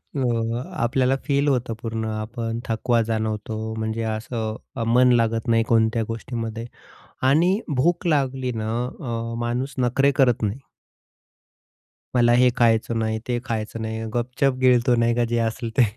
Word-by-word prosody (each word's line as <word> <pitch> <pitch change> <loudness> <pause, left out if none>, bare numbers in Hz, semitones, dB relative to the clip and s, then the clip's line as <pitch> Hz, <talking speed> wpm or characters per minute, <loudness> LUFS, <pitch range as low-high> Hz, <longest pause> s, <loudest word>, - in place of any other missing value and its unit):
अ, 120 -2 0 0.2
आपल्याला 130 +2 +2
फील 140 0 +1
होतं 125 -4 +1
पूर्ण, 115 -1 -3
आपण 115 +1 -4
थकवा 115 +1 +1
जाणवतो. 110 0 -3
म्हणजे 110 +1 -2
असं 110 -1 -4 0.4
मन 125 0 +6
लागत 115 -1 +1
नाही 115 -1 +3
कोणत्या 115 0 +3
गोष्टीमध्ये. 115 0 -5 0.6
आणि 170 +10 +4 0.2
भूक 170 +6 +1
लागली 135 -4 0
ना 110 - -3 0.3
अ, 115 -4 -4
माणूस 120 +3 -2
नखरे 130 +3 +3
करत 125 -4 +3
नाही. 105 +6 -1 1.6
मला 120 -1 +5
हे 125 0 +6
खायचं 115 -1 +2
नाही, 110 0 -1
ते 120 -1 0
खायचं 110 0 -3
नाही. 110 0 -4
गपचूप 125 +3 0
गिळतो, 125 -1 +4
नाही 115 0 +2
का? 120 - +2
जे 120 - 0
असेल 115 +1 -4
ते. 125 - +7
115 Hz, 145 wpm, -23 LUFS, 115-125 Hz, 1.6 s, ते